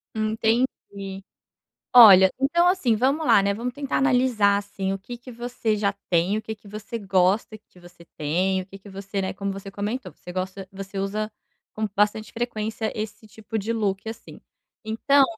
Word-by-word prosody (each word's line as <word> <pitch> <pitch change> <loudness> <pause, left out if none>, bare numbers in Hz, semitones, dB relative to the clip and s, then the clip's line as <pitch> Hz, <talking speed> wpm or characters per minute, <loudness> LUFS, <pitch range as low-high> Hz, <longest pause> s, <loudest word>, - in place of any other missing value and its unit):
Entendi. 215 -3 -1 0.7
Olha, 195 -6 +10
então 340 +6 +3
assim, 360 -11 +2
vamos 275 +8 +1
lá 195 - +6
né, 200 - +1
vamos 235 +4 -4
tentar 280 -1 -2
analisar, 250 -7 +3
assim, 195 -1 -3
o 195 - -3
que 240 +5 -9
que 250 +1 -11
você 235 -2 -2
já 200 -1 +1 0.2
tem, 175 +4 +2
o 220 - -6
que 220 0 -5
que 210 -1 -18
você 215 +3 -6
gosta 195 +2 +1
que 185 -3 -22
você 175 -1 -16
tem, 185 +5 0
o - - -14
que 195 0 -12
que 195 - -15
você 195 0 -5
né, 190 0 -2
como 200 0 -3
você 195 0 -8
comentou, 205 - -4
você 180 - -11
gosta 185 +1 -4
você 195 0 -7
usa 210 +2 -2 0.4
com 215 0 -2
bastante 210 +1 +1
frequência 220 -2 -3
esse 215 0 -6
tipo 220 +1 -6
de 220 +3 -2
look, 205 -2 -1
assim, 225 +1 -9 0.4
então 275 +6 +4
210 Hz, 180 wpm, -24 LUFS, 195-230 Hz, 0.7 s, Olha